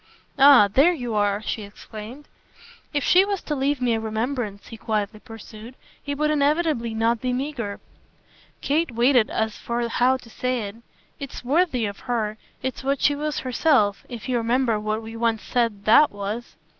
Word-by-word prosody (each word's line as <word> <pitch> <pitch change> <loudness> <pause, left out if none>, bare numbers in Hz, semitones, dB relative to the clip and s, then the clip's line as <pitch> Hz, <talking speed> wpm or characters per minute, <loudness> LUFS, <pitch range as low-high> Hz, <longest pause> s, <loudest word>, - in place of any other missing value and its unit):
"Ah 275 -6 +8
there 275 - +4
you 245 -8 -4
are!" 205 0 +1
she 220 - -3
exclaimed. 215 +6 -10 0.6
"If 290 -3 -1
she 365 +7 +5
was 400 -1 -2
to 300 - -3
leave 280 0 0
me 245 -2 +1
a 225 - 0
remembrance," 220 -1 -3
he - - -8
quietly 215 -1 -3
pursued, 225 +1 -11 0.3
"it 285 0 -2
would 305 +1 +1
inevitably 290 -5 +1
not 230 +1 +1
be 255 - -1
meagre." 250 -5 -3 0.8
Kate 315 +3 +1
waited 240 0 +3
as 220 -1 -2
for 235 0 -2
how 250 +3 +2
to 250 - -16
say 250 0 -2
it. 205 +1 -6 0.4
"It's 275 -3 -8
worthy 275 -4 +2
of 200 -1 -5
her. 215 -3 -1 0.2
It's 260 +1 -4
what 275 0 0
she 290 - +3
was 300 +1 -3
herself 250 -6 +2
if 240 -2 -7
you 250 -1 +1
remember 235 -1 +1
what 215 +1 -2
we 225 +1 -8
once 225 -1 0
said 230 -5 -1
THAT 290 +7 +6
was." 205 +1 -5
240 Hz, 175 wpm, -23 LUFS, 220-275 Hz, 0.8 s, Ah